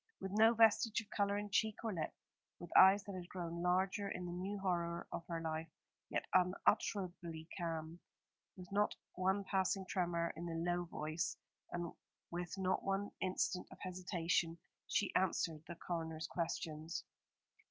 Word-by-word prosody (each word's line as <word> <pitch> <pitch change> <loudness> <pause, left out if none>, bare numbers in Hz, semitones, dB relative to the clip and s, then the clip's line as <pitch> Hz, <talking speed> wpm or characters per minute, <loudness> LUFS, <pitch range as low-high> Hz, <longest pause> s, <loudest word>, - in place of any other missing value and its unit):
With 190 - -4
no 220 +3 +6
vestige 225 0 +5
of 215 - -17
colour 200 0 +1
in 205 0 -4
cheek 220 +1 +2
or 225 -2 -1
lip, 160 -3 -2 0.5
with 175 - -9
eyes 195 +2 +9
that 200 - -6
had 180 -2 -6
grown 170 -2 -4
larger 190 +3 +2
in 180 -1 -4
the 175 - -4
new 190 +4 -3
horror 170 -3 -1
of 170 - -5
her 170 -1 -2
life, 160 0 -3 0.4
yet - - -1
unutterably 180 -3 +1
calm, 165 -1 -3 0.6
with 180 -1 -8
not 205 +1 +2 0.2
one 190 +2 +1
passing 190 0 +1
tremor 170 -3 0
in 170 +2 -5
the 165 - -3
low 175 +1 0
voice, 155 0 -2 0.3
and 175 -1 -3 0.4
with 175 +2 -3
not 185 -1 +1
one 195 +1 0
instant 185 0 0
of - - -10
hesitation, 175 -2 0 0.3
she 205 - +1
answered 165 -4 +1
the 170 - -6
coroner's 160 -2 -3
questions. 165 -1 -3
180 Hz, 155 wpm, -38 LUFS, 170-195 Hz, 0.6 s, eyes